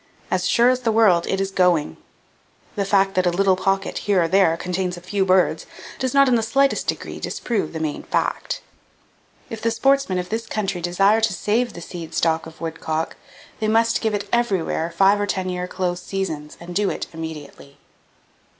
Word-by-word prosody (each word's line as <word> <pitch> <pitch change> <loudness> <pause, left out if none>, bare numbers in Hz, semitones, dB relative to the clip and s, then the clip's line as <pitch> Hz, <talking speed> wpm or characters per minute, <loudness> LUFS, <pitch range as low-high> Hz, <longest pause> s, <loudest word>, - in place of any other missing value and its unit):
As 185 0 +1
sure 240 +2 +5
as 255 - 0
the 235 -3 0
world, 205 -6 +4
it 190 - 0
is 195 0 -1
going! 175 - +2 0.8
The 200 - -1
fact 195 0 +2
that 185 -1 +2
a - - +5
little 190 +2 +3
pocket 195 +1 -1
here 195 -4 +2
or - - +1
there 165 -2 +3
contains 180 0 -3
a - - -7
few 190 +3 -1
birds 185 -1 +2 0.3
does 260 -1 -1
not 275 +1 +5
in 255 - +3
the 235 - +3
slightest 270 +5 +1
degree - - -3
disprove 230 -5 -2
the 160 - -5
main 155 -2 -3
fact. - - -2 0.9
If 225 - -6
the 230 - +1
sportsmen 270 -3 +2
of 180 0 -3
this 225 +1 -3
country 195 -5 -2
desire 195 +5 +3
to 220 -3 +2
save 220 +6 0
the 170 - -9
seed 170 -1 -8
stock 160 0 +1
of 160 - -14
woodcock, 160 -1 -3 0.4
they 215 - 0
must 230 +1 +2
give 220 -2 0
it 205 0 -4
everywhere 195 -8 0
five 195 +4 +3
or 205 - -1
ten 185 -2 -2
year 180 0 -3
close 180 -1 -2
seasons, 160 -6 -4
and 175 +1 -9
do 205 -1 +2
it - - -3
immediately! 155 -3 -8
190 Hz, 195 wpm, -22 LUFS, 175-220 Hz, 0.9 s, sure